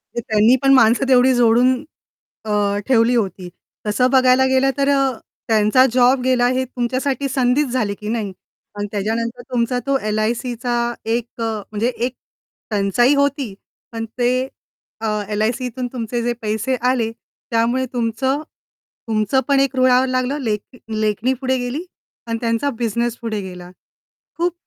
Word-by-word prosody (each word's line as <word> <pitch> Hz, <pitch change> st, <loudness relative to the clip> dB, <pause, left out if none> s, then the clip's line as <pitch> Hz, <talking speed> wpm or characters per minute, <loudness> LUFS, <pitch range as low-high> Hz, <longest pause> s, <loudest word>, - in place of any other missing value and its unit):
ते -, -, -1 dB
त्यांनी 220 Hz, +2 st, +4 dB
पण 275 Hz, 0 st, +5 dB
माणसं 240 Hz, +1 st, +4 dB
तेवढी 255 Hz, 0 st, +5 dB
जोडून 245 Hz, +1 st, +4 dB, 0.7 s
अ, 205 Hz, -1 st, +1 dB
ठेवली 245 Hz, -1 st, +4 dB
होती. 190 Hz, -5 st, -2 dB, 0.4 s
तसं 230 Hz, +5 st, +2 dB
बघायला 260 Hz, 0 st, +5 dB
गेलं 265 Hz, +1 st, +3 dB
तर 280 Hz, 0 st, +2 dB
अ, 275 Hz, -1 st, +3 dB, 0.4 s
त्यांचा 220 Hz, +3 st, +4 dB
जॉब 255 Hz, +1 st, +4 dB
गेला, 250 Hz, -1 st, +3 dB
हे 255 Hz, +1 st, +1 dB
तुमच्यासाठी 260 Hz, +3 st, -2 dB
संधीच 260 Hz, +2 st, +2 dB
झाली 240 Hz, -5 st, -1 dB
की 210 Hz, -, -7 dB
नाही? 220 Hz, -3 st, -2 dB, 0.5 s
आणि 205 Hz, 0 st, -2 dB
त्याच्यानंतर 230 Hz, +4 st, -2 dB
तुमचा 245 Hz, 0 st, 0 dB
तो 275 Hz, 0 st, +2 dB
एल-आय-सीचा 235 Hz, +3 st, -1 dB, 0.4 s
एक 235 Hz, -1 st, 0 dB, 0.2 s
अ, -, -, 0 dB, 0.3 s
म्हणजे 215 Hz, +2 st, 0 dB
एक 245 Hz, +1 st, -2 dB, 0.6 s
टंचाई 210 Hz, +6 st, +3 dB
होती, 280 Hz, -5 st, 0 dB, 0.4 s
पण 225 Hz, -1 st, -4 dB
ते 245 Hz, 0 st, +3 dB, 0.7 s
अ, 225 Hz, -, -1 dB, 0.2 s
एल-आय-सीतून 240 Hz, +4 st, -2 dB
तुमचे 240 Hz, -1 st, -3 dB
जे 240 Hz, 0 st, 0 dB
पैसे 220 Hz, +4 st, -1 dB, 0.2 s
आले, 230 Hz, -3 st, 0 dB, 0.4 s
त्यामुळे 235 Hz, +3 st, +1 dB
तुमचं 250 Hz, +4 st, -1 dB, 0.7 s
तुमचं 215 Hz, +3 st, +1 dB
पण 280 Hz, -1 st, +3 dB
एक 275 Hz, 0 st, +1 dB
रुळावर 255 Hz, 0 st, +4 dB
लागलं, 255 Hz, +2 st, -1 dB
लेख 225 Hz, 0 st, -4 dB
लेखणी 215 Hz, +3 st, 0 dB
पुढे 260 Hz, 0 st, -1 dB
गेली 250 Hz, +6 st, -3 dB, 0.4 s
आणि 230 Hz, 0 st, -1 dB
त्यांचा 230 Hz, +4 st, 0 dB
बिझनेस 235 Hz, 0 st, -1 dB
पुढे 225 Hz, -2 st, -3 dB
गेला. 180 Hz, -2 st, -9 dB, 0.7 s
खूप 345 Hz, +1 st, 0 dB
245 Hz, 145 wpm, -20 LUFS, 220-260 Hz, 0.7 s, पण